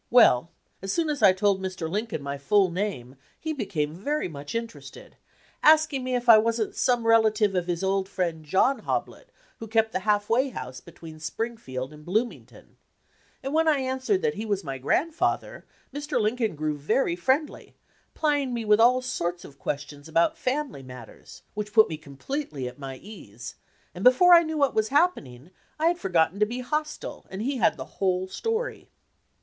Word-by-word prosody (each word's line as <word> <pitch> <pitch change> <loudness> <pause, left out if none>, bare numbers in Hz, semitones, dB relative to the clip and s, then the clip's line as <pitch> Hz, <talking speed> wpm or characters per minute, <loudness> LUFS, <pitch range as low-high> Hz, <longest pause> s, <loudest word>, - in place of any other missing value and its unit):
Well, 170 - +5 0.3
as 195 0 -3
soon 320 +3 0
as 290 - -4
I 200 -3 +8
told 190 0 +1
Mr. 185 -3 -4
Lincoln 205 -3 -3
my 140 0 -4
full 190 +6 +3
name 170 -10 -4 0.2
he 315 0 -3
became 175 - -2
very 285 - -2
much 145 +2 -8
interested, 230 0 -7 0.5
asking 310 -3 +4
me 255 0 -1
if 245 0 -3
I 225 -2 +9
was 230 +1 0
n't 220 - -2
some 245 -2 +1
relative 220 -2 +4
of 180 -2 -1
his 175 +1 -2
old 190 0 0
friend 170 -5 -2
John 195 - +2
Hoblit - - -4 0.3
who 225 - -7
kept 220 0 +2
the - - -1
half 205 +1 +1
way 255 +4 +2
house 130 - -7
between 160 -2 -12
Springfield 155 - -5
and 150 0 -13
Blooming 220 +8 -1
ton; - - -19 0.7
and 270 +2 -3
when 320 +1 +3
I 305 -2 +4
answered 265 - -1
that 460 -1 +1
he - - -5
was 200 -3 -2
my 135 -2 -5
grand 310 - 0
father, 335 - -2 0.3
Mr. 290 -2 -2
Lincoln 220 -2 0
grew 155 0 -2
very 170 - +1
friendly, 265 - -1 0.4
plying 290 -5 0
me 230 -1 -3
with 210 0 +4
all 250 +2 +5
sorts 175 -8 -3
of 140 - -14
questions 145 +1 -5
about 165 +1 +2
family 265 - -2
mat 125 -3 -10
ters, - - -15
which 210 0 -5
put 220 -1 +7
me 155 - -5
completely 145 - -5
at 125 +2 -10
my 135 -2 -7
ease, 125 - -10 0.4
and 180 - -7
before 305 +9 +7
I 340 - +9
knew 315 -1 -3
what 280 -2 +2
was 220 0 +1
happening, 180 - 0 0.3
I 320 +2 +3
had 350 0 -2
for 195 - -4
gotten 175 +2 +2
to 210 - +3
be 245 +3 -4
hostile 305 +4 -4
and 190 +3 -5
he 270 +2 -1
had 180 -7 +2
the 130 - -6 0.2
whole 185 -1 +1
story. 450 - -3
210 Hz, 190 wpm, -26 LUFS, 165-260 Hz, 0.7 s, I